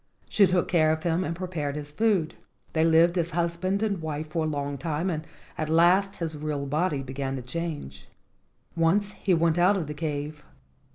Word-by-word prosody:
She 200 -2 +5
took 180 0 +1
care 155 -3 +3
of 160 0 -2
him 170 +1 +1
and 170 - -3
prepared 165 -6 -3
his 150 -1 -6
food. 195 -3 +1 0.4
They 160 - +2
lived 165 +2 +4
as 170 0 0
husband 175 +4 0
and 200 -5 -1
wife 155 -1 -4
for 160 0 0
a - - 0
long 145 -2 -3
time, 165 +5 -1
and 155 -1 -4 0.3
at 155 -1 -1
last 180 +5 +4
his 165 -2 -4
real 150 -1 -3
body 150 0 0
began 135 +1 -4
to 130 - -5
change. 130 - -5 0.7
Once 185 +5 +2
he 190 -3 +1
went 165 0 +2
out 190 +3 +4
of 175 - -2
the 150 - -5
cave. 150 -1 -4
160 Hz, 190 wpm, -27 LUFS, 150-175 Hz, 0.7 s, She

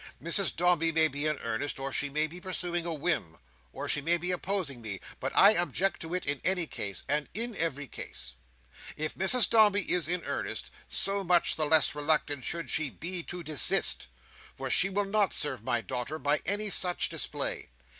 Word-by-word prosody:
Mrs 170 +3 +1
Dombey 170 -1 +2
may 160 0 +7
be 145 +1 -3
in 150 -1 -1
earnest, 115 +5 -4
or 135 0 -5
she 145 - 0
may 155 +2 +5
be 170 +3 -9
pursuing 175 -2 -3
a - - -3
whim, 150 - -2 0.3
or - - -7
she 145 - 0
may 170 +4 +4
be 180 +2 -3
opposing 180 -8 -3
me; 105 -4 -7 0.2
but - - -4
I 200 - +8
object 175 0 +1
to 165 +2 -5
it 180 - -4
in 145 -1 +1
any 180 -1 0
case, 100 -9 -5
and 150 +1 -1
in 230 +1 -3
every 145 -5 -1
case. 65 - -9 0.6
If 155 0 -4
Mrs 220 +6 +5
Dombey 210 -3 +4
is 180 -4 +1
in 175 0 +3
earnest, - - -5 0.2
so 200 0 -1
much 175 -1 +2
the 155 -1 -1
less 160 0 +4
reluctant 145 -2 0
should 170 -1 -4
she 155 -3 0
be 175 +7 -3
to 175 +1 -8
desist; 150 - +2 0.5
for - - -5
she 195 - +5
will 200 +1 -2
not 200 -1 0
serve 130 -7 -3
my 120 0 -1
daughter 125 +7 -5
by 145 +1 -1
any 205 +2 0
such 180 -2 +2
display. - - -2
165 Hz, 195 wpm, -28 LUFS, 145-185 Hz, 0.6 s, I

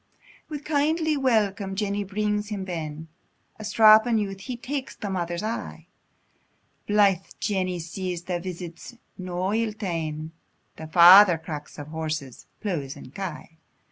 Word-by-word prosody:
Wi' 305 - -4
kindly 305 +2 +1
welcome, 210 -7 +1
Jenny 205 0 -1
brings 210 +1 -2
him 205 -3 -4
ben; 160 -3 -5 0.5
A - - -7
strappin 220 +2 +6
youth, 195 -2 -3
he 245 +5 -6
takes 265 +2 -5
the 205 -3 -5
mother's 175 0 -3
eye; 225 +2 -5 1.0
Blythe 200 -3 +4 0.2
Jenny 185 -3 -1
sees 175 +1 -5
the 175 -1 -2
visit's 175 +5 -8 0.2
no 185 +1 -3
ill 225 -1 0
ta'en; 160 -6 -4 0.5
The 160 - -8
father 175 +2 +8
cracks 150 -2 -8
of 145 0 -8
horses, 155 -5 -5
pleughs, 155 -9 -3
and 140 -2 -12
kye. 165 -3 -7
190 Hz, 135 wpm, -25 LUFS, 170-215 Hz, 1.0 s, father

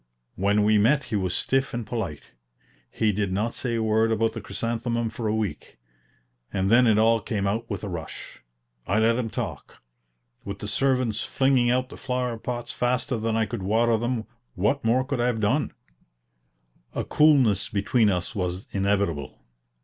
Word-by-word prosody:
When 100 +2 +2
we 105 0 +4
met 135 +7 +3
he - - +2
was 95 -3 0
stiff 135 -1 +1
and 120 -2 -3
polite. 105 -10 -4 0.7
He 110 -1 +1
did 100 -1 -1
not 105 +5 -1
say 120 -2 -2
a 115 - 0
word 110 +1 +2
about 115 0 +1
the 115 - -6
chrysanthemum 115 +2 -2
for 115 - -4
a 105 - +1
week, 110 -3 -4 0.7
and 95 +1 0
then 125 +1 +6
it 110 -2 +4
all 115 +1 +4
came 100 -2 -2
out 110 +4 -2
with 100 -2 -4
a - - -3
rush. 85 -5 -7 0.5
I 100 - +1
let 115 +1 +4
him 120 -3 -2
talk. - - -6 0.6
With 100 0 -6
the 105 - -6
servants 125 -1 +1
flinging 130 -3 +2
out 130 +1 +1
the - - -10
flower 125 -3 -2
pots 120 +1 -4
faster 125 +1 0
than 110 0 -1
I 110 0 +2
could 110 0 -5
water 115 +4 +2
them, 120 0 -2 0.3
what 105 +9 +1
more 120 +3 +3
could 130 -2 -2
I 120 - +2
have 120 -2 0
done? 115 +8 +1 1.2
A - - -1
coolness 130 - +4
between 105 +2 +2
us 90 +3 -1
was 90 -2 -3
inevitable. 100 -7 -1
110 Hz, 180 wpm, -25 LUFS, 100-120 Hz, 1.2 s, then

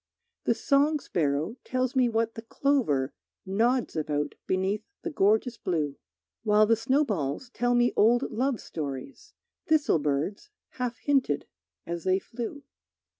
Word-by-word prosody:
The - - +3
song 290 +2 +3
sparrow 160 - -1
tells 255 +1 -1
me 255 -2 +4
what 225 0 0
the 225 - -7
clover 225 - +1 0.3
Nods 230 +6 +1
about 150 -2 -1
beneath 190 +3 0 0.2
the - - -3
gorgeous 220 0 +2
blue; 155 -6 -1 0.5
While 210 -1 +5
the 230 +2 +4
snowballs 225 - 0
tell 245 0 +1
me 240 0 +3
old 240 +4 +4
love 250 +1 0
stories 160 - -7 0.3
Thistle 310 - +3
birds 150 - -2 0.2
half 250 -2 -3
hinted 270 - +1 0.4
as 170 -1 -4
they 185 0 +3
flew. 240 +7 -6
225 Hz, 130 wpm, -28 LUFS, 170-255 Hz, 0.5 s, While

